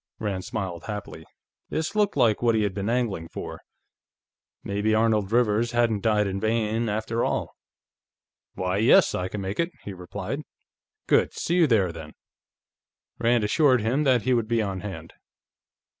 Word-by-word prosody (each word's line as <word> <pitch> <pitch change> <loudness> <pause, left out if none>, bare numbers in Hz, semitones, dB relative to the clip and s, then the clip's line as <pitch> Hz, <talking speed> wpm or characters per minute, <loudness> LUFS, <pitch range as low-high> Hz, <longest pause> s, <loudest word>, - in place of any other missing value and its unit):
Rand 100 -4 -3
smiled 95 -6 -5
happily. 105 -6 -7 0.4
This 160 +6 -2
looked 210 -1 +1
like 110 -3 +3
what 115 -2 +3
he 110 - +2
had 100 -2 -1
been 100 +2 -3
angling 115 -9 -1
for. - - -7 1.0
Maybe 105 +2 0
Arnold 110 -2 +2
Rivers 120 0 +2
hadn't 115 -3 +2
died 105 -1 +2
in 95 0 -2
vain, 110 +1 0
after 110 +2 -1
all. - - -2 1.0
"Why, 90 +1 -1
yes; 110 - +5
I 90 - -2
can 100 +2 -5
make 95 +1 -4
it," 170 +1 +1
he 100 - -6
replied. 95 +8 -5 0.6
"Good. - - +3
See 175 - -1
you 170 -3 +5
there, 100 -8 +2
then." 80 -2 -10 1.1
Rand 120 -1 +2
assured 130 +3 +3
him 125 +7 +1
that 125 -5 +3
he 130 - +2
would 115 -3 +1
be 115 0 +1
on 100 -3 -2
hand. 90 -5 -8
110 Hz, 160 wpm, -25 LUFS, 100-120 Hz, 1.1 s, yes